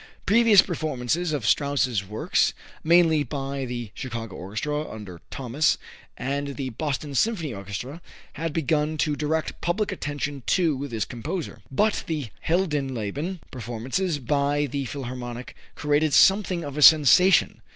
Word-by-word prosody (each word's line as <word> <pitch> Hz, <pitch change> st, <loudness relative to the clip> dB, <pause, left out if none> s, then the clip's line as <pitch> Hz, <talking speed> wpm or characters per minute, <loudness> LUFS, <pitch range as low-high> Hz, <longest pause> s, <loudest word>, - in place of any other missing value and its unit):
Previous 215 Hz, -2 st, +6 dB
performances 155 Hz, -1 st, -2 dB
of 145 Hz, -7 st, -2 dB
Strauss's 130 Hz, -6 st, +1 dB
works, 105 Hz, +3 st, 0 dB, 0.3 s
mainly 165 Hz, -2 st, +5 dB
by 140 Hz, -2 st, -3 dB
the 120 Hz, -4 st, -5 dB
Chicago 115 Hz, -5 st, -6 dB
Orchestra, 150 Hz, +11 st, -3 dB
under 100 Hz, -6 st, -9 dB
Thomas, 135 Hz, +4 st, +1 dB, 0.4 s
and 140 Hz, +1 st, -3 dB
the 135 Hz, -2 st, -4 dB
Boston 145 Hz, +3 st, -3 dB
Symphony 165 Hz, -, 0 dB
Orchestra, 100 Hz, -, -6 dB, 0.3 s
had 165 Hz, +2 st, -3 dB
begun 155 Hz, 0 st, 0 dB
to 150 Hz, 0 st, +1 dB
direct 155 Hz, +2 st, -2 dB
public 200 Hz, +5 st, 0 dB
attention 145 Hz, -5 st, -4 dB
to 150 Hz, -6 st, +1 dB
this 115 Hz, -5 st, -2 dB
composer. 125 Hz, -, -5 dB
But 210 Hz, +10 st, +1 dB
the 150 Hz, -8 st, -3 dB, 0.2 s
"Heldenleben" 150 Hz, -, -1 dB
performances 130 Hz, -, -2 dB
by 145 Hz, +2 st, 0 dB
the 140 Hz, 0 st, -3 dB
Philharmonic 125 Hz, -2 st, -6 dB, 0.2 s
created 150 Hz, 0 st, +1 dB
something 190 Hz, -3 st, +4 dB
of 145 Hz, -1 st, -6 dB
a -, -, -1 dB
sensation. 155 Hz, +5 st, +6 dB
145 Hz, 130 wpm, -25 LUFS, 125-160 Hz, 0.4 s, Previous